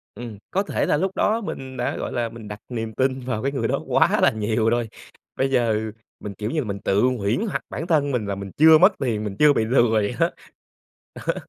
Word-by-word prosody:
Ừm. 115 -4 -8
Có 195 +2 +1
thể - - -1
là - - +2
lúc 190 +4 0
đó 225 +2 +1
mình 130 - -6
đã, 120 - -1
gọi - - -4
là, 120 -2 -1
mình 110 -2 -10
đặt 105 0 -7
niềm 115 -2 -4
tin 130 +2 0
vào 125 -3 -4
cái 140 - 0
người 135 - -1
đó - - 0
quá - - +3
là - - +5
nhiều 110 +1 0
rồi. 120 -1 0 0.5
Bây 135 0 +1
giờ 110 -3 +1 0.3
mình, 105 - -7
kiểu 105 +4 -4
như 160 - 0
là, 130 - -2
mình 100 -1 -4
tự 100 +2 +1
huyễn 120 - +1
hoặc - - -2
bản 165 - -5
thân 145 -4 +2
mình 120 -5 -1
là 100 -1 -2
mình 100 -1 -7
chưa 160 +1 +8
mất 185 +5 +6
tiền, 115 -5 -1
mình 100 -2 -4
chưa 150 -1 +6
bị 110 - +1
lừa 120 0 +3
vậy 105 -2 +1
đó. - - +3 1.0
Đó. - - +2
120 Hz, 245 wpm, -23 LUFS, 110-135 Hz, 1.0 s, chưa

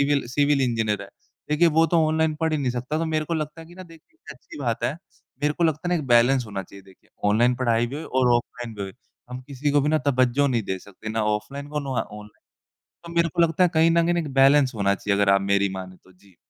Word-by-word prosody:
Civil 140 -2 +1
civil 145 +2 +2
engineer 115 -4 0
है। - - -11 0.4
देखिए 160 +3 +4
वो 165 - +5
तो 165 -2 +2
ऑनलाइन 160 0 +1
पढ़ 160 -1 0
ही 155 - 0
नहीं 130 -3 -1
सकता 125 +6 -3
तो 165 - -1
मेरे 155 -1 -1
को 170 - -3
लगता 155 +1 -4
है 165 - -12
कि 175 - -15
ना 185 - -10
देखिए 165 - -18
ये - - -12
अच्छी 125 - -13
बात 120 -5 -2
है। - - +1 0.5
मेरे 150 0 +2
को 170 - 0
लगता 160 +2 0
है 180 - +1
ना - - +1
एक - - -9
बैलेंस 120 +1 +4
होना 100 -2 -5
चाहिए 100 +1 -15
देखिए 95 -1 -22 0.2
ऑनलाइन 120 +4 +3
पढ़ाई 120 -2 +1
भी 135 +4 -6
होए 160 - -6
और 130 -1 +1
ऑफलाइन 120 -1 -6
भी 100 - -6
होए। 95 - -6 0.4
हम 125 0 -6
किसी 140 +1 -2
को 145 - +3
भी 145 - 0
ना 155 0 +2
तवज्जो 130 +1 +2
नहीं 120 -4 0
दे 95 -1 -4
सकते 100 +3 -11
ना 110 0 -1
ऑफलाइन 140 +7 -9
को 150 0 -3
ना 140 -1 -6
औ 130 - 0 0.2
ऑन 105 0 -11 0.8
तो 170 - -10
मेरे 170 0 +3
को 165 - -2
लगता 165 +2 +2
है - - +4
कहीं 160 +1 +4
न 170 0 +3
कहीं 175 - +1
ना 175 - +1
एक 145 -4 -6
बैलेंस 135 0 +5
होना 100 -1 +1
चाहिए 100 +1 -1
अगर 100 - +4
आप 100 - +3
मेरी 100 0 +1
मानें 95 -1 -8
तो। 95 - -20
जी। 95 0 -24
135 Hz, 275 wpm, -24 LUFS, 110-155 Hz, 0.8 s, वो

